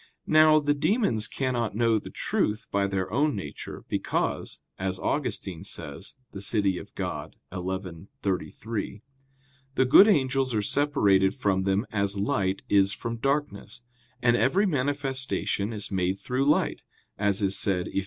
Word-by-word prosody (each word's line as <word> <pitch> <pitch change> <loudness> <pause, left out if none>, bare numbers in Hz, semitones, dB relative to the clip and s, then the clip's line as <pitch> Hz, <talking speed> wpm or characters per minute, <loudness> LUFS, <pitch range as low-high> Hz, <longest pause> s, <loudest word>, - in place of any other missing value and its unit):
Now, 155 0 +6
the 145 -1 +1
demons 145 - +1
cannot 120 -6 -2
know 115 -1 +3
the - - -10
truth 105 +2 -1
by 100 0 +1
their 95 -1 -2
own 145 +1 +2
nature, 100 - -7
because, - - -2 0.2
as 95 0 -1
Augustine 95 - -2
says - - -5 0.2
(De 95 - -8
Civ. 105 +1 0
Dei 95 -2 0
xi, 95 -1 -6 0.2
33), 100 +2 -3 0.7
the 130 - +3
good 165 +11 +8
angels 135 - +2
are 105 - +2
separated 100 -8 +2
from 100 -7 0
them 100 +4 +1
as 100 -1 0
light 100 -1 0
is 100 -1 +4
from 115 +2 -4
darkness; 120 -4 -2 0.4
and 120 -1 +4
every 185 +12 +3
manifestation 135 - -1
is 105 -2 -4
made 95 0 0
through 130 +7 0
light, 150 - +1 0.4
as 100 0 +2
is 95 0 +3
said 90 -3 +1
Eph. - - -1
105 Hz, 145 wpm, -27 LUFS, 95-135 Hz, 0.7 s, good